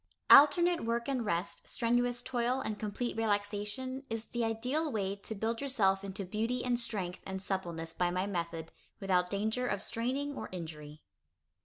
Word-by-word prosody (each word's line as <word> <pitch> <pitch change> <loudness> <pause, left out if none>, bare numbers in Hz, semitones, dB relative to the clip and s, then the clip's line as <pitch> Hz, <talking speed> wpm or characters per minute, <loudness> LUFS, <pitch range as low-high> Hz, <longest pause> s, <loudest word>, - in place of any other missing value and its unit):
Alternate 340 +5 +7
work 235 +2 -1
and 265 -3 0
rest, 185 -3 -1
strenuous 245 +1 +1
toil 245 0 0
and 215 -5 -3
complete 220 +3 -3
relaxation, 210 +4 -1
is 225 0 -3
the 240 0 -2
ideal 250 +8 0
way 200 -3 -1
to 220 +2 -5
build 225 +4 -2
yourself 200 -9 +2
into 195 0 -4
beauty 225 +6 -1
and 245 -1 +1
strength 190 -7 -1
and 190 0 -4
suppleness 175 -4 -1
by 180 -1 +1
my 180 +2 0
method, 170 -4 -4 0.3
without 180 -2 +1
danger 220 +5 -1
of 205 - -1
straining 260 +7 -1
or 220 - -6
injury. 155 -4 -8
220 Hz, 160 wpm, -32 LUFS, 190-245 Hz, 0.3 s, Alternate